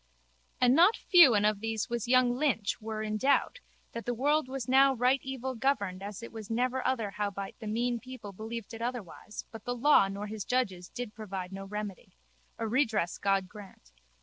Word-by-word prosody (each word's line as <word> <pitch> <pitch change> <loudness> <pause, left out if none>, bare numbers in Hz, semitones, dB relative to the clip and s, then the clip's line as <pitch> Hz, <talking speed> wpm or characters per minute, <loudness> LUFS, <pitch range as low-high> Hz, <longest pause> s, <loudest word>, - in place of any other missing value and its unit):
And 250 0 +5
not 350 +9 +5
few 340 - +7
and 205 0 +3
of 210 -1 +2
these 225 0 -2
was 235 -1 -3
young 250 -1 +4
Lynch 250 -8 0
were 215 0 -4
in 215 0 -2
doubt 280 - +2 0.3
that 230 0 -7
the 245 - 0
world 290 +3 +2
was 260 -3 -5
now 270 +1 +5
right 250 +3 +3
evil 265 -1 -4
governed 220 -7 -1
as 205 +2 -7
it 230 - -8
was 220 -1 -8
never 250 +3 0
other 225 -6 -1
howbeit 200 -1 -4
the 220 - -7
mean 235 +2 0
people 250 -4 -9
believed 220 +3 -7
it 225 - -7
otherwise 230 -4 -6
but 220 -2 -10
the 245 - -3
law 245 -4 +5
nor 200 +1 -5
his 210 -1 -5
judges 195 -9 -1
did 240 -3 -6
provide 195 -4 -6
no 195 0 -7
remedy. 205 - -7 0.4
A 225 - -2
redress 220 -7 0
God 195 -1 +1
grant. 190 - -14
225 Hz, 195 wpm, -30 LUFS, 205-255 Hz, 0.4 s, few